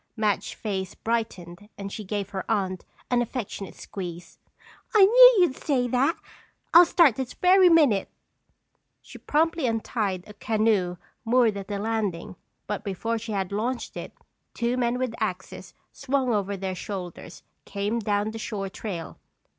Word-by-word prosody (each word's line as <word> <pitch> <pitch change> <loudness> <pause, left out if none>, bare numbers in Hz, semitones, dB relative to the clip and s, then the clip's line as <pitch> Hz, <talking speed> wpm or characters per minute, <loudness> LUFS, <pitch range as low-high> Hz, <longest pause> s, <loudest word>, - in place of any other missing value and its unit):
Madge's 210 -2 0
face 190 -3 -4
brightened 205 -4 -4
and 200 0 -6
she 215 - -6
gave 200 0 -4
her 190 -1 -4
aunt 190 -4 -1 0.3
an 245 -1 +3
affectionate 225 -5 -5
squeeze. 175 -3 -8 0.6
"I 405 -3 +8
knew - - +8
you'd 355 -8 +3
say 255 -4 0
that! 265 +7 +2 0.6
I'll 345 +1 +10
start 330 -11 +4
this 260 -2 -4
very 365 0 +5
minute!" 290 - +4 0.9
She - - -12
promptly 320 -1 +1
untied 215 -5 -2
a 210 - -12
canoe 210 -4 0 0.3
moored 235 -2 +3
at 195 -1 -6
the 205 - -3
landing 205 -3 -2 0.3
but 210 -1 -4
before 225 +4 -2
she 225 0 -7
could 195 -2 -2
launch 235 +5 -3
it - - -6 0.4
two 235 +1 0
men 245 -1 0
with 255 -2 -2
axes 185 -3 -5 0.2
swung 265 -2 -1
over 200 -1 -1
their 190 0 -3
shoulders 180 -2 -7 0.2
came 205 +3 -2
down 205 0 -1
the 225 - -7
shore 205 -3 -4
trail. 185 -5 -7
215 Hz, 150 wpm, -25 LUFS, 195-250 Hz, 0.9 s, I'll